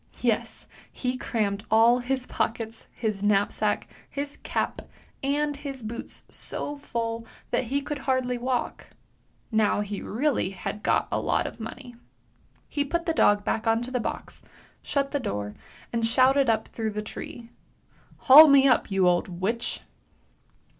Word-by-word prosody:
Yes, - - -1 0.3
he 250 0 -2
crammed 210 -5 -1
all 230 +3 +5
his 255 +1 -2
pockets, 225 -2 -3
his 215 -4 -3
knapsack, 205 -1 +1 0.2
his 285 0 -5
cap, - - -2 0.4
and 290 +2 0
his 280 -3 -7
boots 230 +2 -6
so 290 - -5
full 230 -4 -4 0.2
that 245 +1 +1
he 275 +4 -1
could 295 0 -4
hardly 260 -2 0
walk! 250 0 -2 0.6
Now, 215 -2 +2
he 205 -1 -4
really 255 -2 0
had 195 +2 -5
got - - +2
a - - +1
lot - - +1
of - - -7
money. 245 +3 -8 0.7
He 290 - -1
put 340 +4 -2
the 330 - +1
dog 205 -9 +4
back 225 - -1
on 225 +1 +2
to 250 - -6
the 250 - 0
box, - - -5 0.4
shut 275 -1 -1
the 285 - 0
door, 105 - -3 0.4
and 230 -1 0
shouted 260 +3 +4
up 225 - +1
through 220 -2 -3
the 210 0 -3
tree, 230 +2 -8 0.3
" - - -29
Haul 295 +4 +11
me 275 -1 +6
up, 255 - +3
you 195 -2 +3
old 175 -1 +2
witch! 225 +5 -1
240 Hz, 155 wpm, -26 LUFS, 220-275 Hz, 0.7 s, Haul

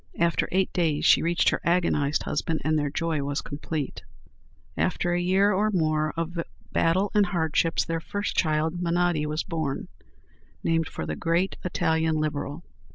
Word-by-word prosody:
After 170 0 +1
eight 190 +1 +1
days 160 -5 +1
she - - +6
reached 170 +1 +2
her - - -1
agonized 170 -4 +1
husband, 155 +1 -2
and 155 0 +1
their 145 -2 +1
joy 160 0 -1
was 140 +1 -2
complete. 145 0 -4 0.7
After 175 0 0
a 175 - +1
year 190 +3 +3
or 210 +3 +2
more 155 -5 +1
of 165 +1 -3 0.3
battles 185 +5 +2
and 205 -2 +4
hardships, 165 -1 +1
their 165 0 -2
first 205 +3 -3
child, 160 +1 +1
Menotti, 170 -3 +1
was 155 +1 -1
born, 155 -4 -3 0.7
named 165 -1 +1
for - - -5
the - - -3
great 170 +3 0
Italian 160 -2 +1
Liberal. 155 +1 -2
165 Hz, 160 wpm, -26 LUFS, 155-175 Hz, 0.7 s, she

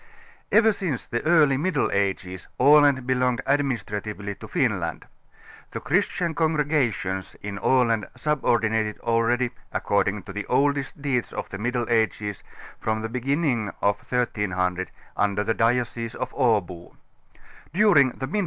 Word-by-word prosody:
Ever 220 0 +5
since 170 - -3
the 120 - -3
early 155 -5 +5
Middle 160 0 0
Ages 95 -2 -2
Aland 145 -3 +5
belonged 125 -1 +1
administratively 105 -7 -2
to - - -11
Finland. - - -1 0.6
The - - -5
christian 170 -2 0
congregations 145 - 0
in 100 -1 -5
Aland 115 -4 +2
subordinated 110 -7 0
already, 120 +1 +1 0.2
according 100 0 0
to 100 - -9
the 105 +1 -5
oldest 140 +1 0
deeds 135 -4 -1
of - - -5
the 95 - -7
Middle 120 +2 -1
Ages, 110 -3 0 0.4
from 110 0 -2
the 115 - -3
beginnig 130 -1 0
of 100 0 +2
1300 95 -7 -1 0.3
under 105 0 +1
the 115 - 0
diocese 115 0 0
of 130 0 -4
Abo. 100 -9 0
120 Hz, 120 wpm, -24 LUFS, 105-140 Hz, 0.6 s, Ever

